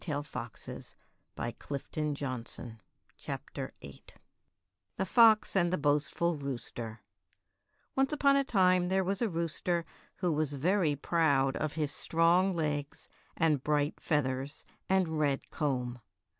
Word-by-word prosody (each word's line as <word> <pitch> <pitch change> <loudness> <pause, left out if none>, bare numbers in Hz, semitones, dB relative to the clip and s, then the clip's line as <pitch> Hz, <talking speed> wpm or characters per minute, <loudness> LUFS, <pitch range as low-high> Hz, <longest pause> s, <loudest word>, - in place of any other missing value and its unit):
THE 145 -4 -2
FOX 120 -6 -7
AND - - -6 0.5
THE 115 0 -3
BOASTFUL 145 +1 -3
ROOSTER 125 -4 -6 0.4
✓ - - -7 0.9
THE 190 - 0
FOX 220 +1 +5
AND 175 -2 +3
THE 185 - +1
BOASTFUL 150 +3 +1
ROOSTER 120 -5 -6 0.9
O 270 - +2
NCE 270 - +2
upon 280 -2 +4
a 275 - +4
time 185 -7 +3
there 190 0 +2
was 195 +3 -1
a 235 - +2
rooster 170 0 -1 0.3
who 180 -2 0
was 150 -1 0
very 165 +1 +2
proud 140 -3 +2
of 155 -1 -2
his 150 -2 -1
strong 175 +3 +3
legs 145 -3 -3 0.3
and 155 -5 +2
bright 150 0 +1
feathers 140 -1 -1 0.2
and 180 -5 +2
red 140 -2 0
comb. 125 -4 -1
155 Hz, 130 wpm, -31 LUFS, 140-180 Hz, 0.9 s, FOX